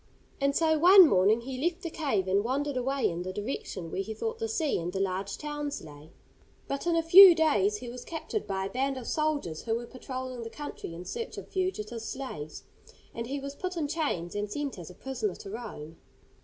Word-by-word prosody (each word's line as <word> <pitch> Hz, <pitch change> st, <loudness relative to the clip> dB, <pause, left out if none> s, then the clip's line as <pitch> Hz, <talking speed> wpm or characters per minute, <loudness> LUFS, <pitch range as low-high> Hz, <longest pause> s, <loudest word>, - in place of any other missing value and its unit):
And 280 Hz, 0 st, +1 dB
so 315 Hz, -1 st, +3 dB
one 365 Hz, +2 st, +9 dB
morning 205 Hz, +1 st, +4 dB
he 260 Hz, +2 st, -5 dB
left 350 Hz, +2 st, -1 dB
the 335 Hz, -, -4 dB
cave, 240 Hz, -, 0 dB
and 195 Hz, +2 st, +2 dB
wandered 280 Hz, +4 st, -1 dB
away 265 Hz, +2 st, +1 dB
in 170 Hz, +1 st, -3 dB
the 185 Hz, +1 st, -4 dB
direction 195 Hz, -5 st, -5 dB
where -, -, -1 dB
he 220 Hz, +2 st, -5 dB
thought 450 Hz, -, -3 dB
the 450 Hz, -, -1 dB
sea 320 Hz, -, 0 dB
and 170 Hz, +1 st, -3 dB
the 190 Hz, -, -3 dB
large 195 Hz, +1 st, -2 dB
towns 295 Hz, -1 st, -4 dB
lay. 150 Hz, 0 st, -12 dB, 0.6 s
But 275 Hz, +4 st, -3 dB
in 340 Hz, -, +3 dB
a 330 Hz, -, +2 dB
few 355 Hz, +2 st, +10 dB
days 210 Hz, -, +3 dB
he 245 Hz, -, -8 dB
was 245 Hz, +1 st, -7 dB
captured 340 Hz, +5 st, -4 dB
by 190 Hz, -1 st, -2 dB
a -, -, -3 dB
band 270 Hz, +1 st, -1 dB
of 250 Hz, -, -6 dB
soldiers 295 Hz, -, -1 dB
who 225 Hz, -1 st, -1 dB
were 235 Hz, +1 st, -4 dB
patrolling 255 Hz, 0 st, -6 dB
the 230 Hz, -, -6 dB
country 290 Hz, -, -7 dB
in 175 Hz, +2 st, -8 dB
search 465 Hz, -, -5 dB
of -, -, -8 dB
fugitive 240 Hz, -, -2 dB
slaves, 225 Hz, -, -6 dB, 0.5 s
and 230 Hz, 0 st, -5 dB
he 280 Hz, +2 st, -3 dB
was 275 Hz, 0 st, -6 dB
put 365 Hz, +4 st, -5 dB
in 305 Hz, -3 st, 0 dB
chains 285 Hz, -, -2 dB
and 205 Hz, 0 st, -3 dB
sent 280 Hz, -4 st, -3 dB
as 170 Hz, -, -8 dB
a 180 Hz, -, -12 dB
prisoner 235 Hz, -7 st, -3 dB
to 195 Hz, -, -9 dB
Rome. 185 Hz, -9 st, -7 dB
255 Hz, 220 wpm, -29 LUFS, 195-305 Hz, 0.6 s, few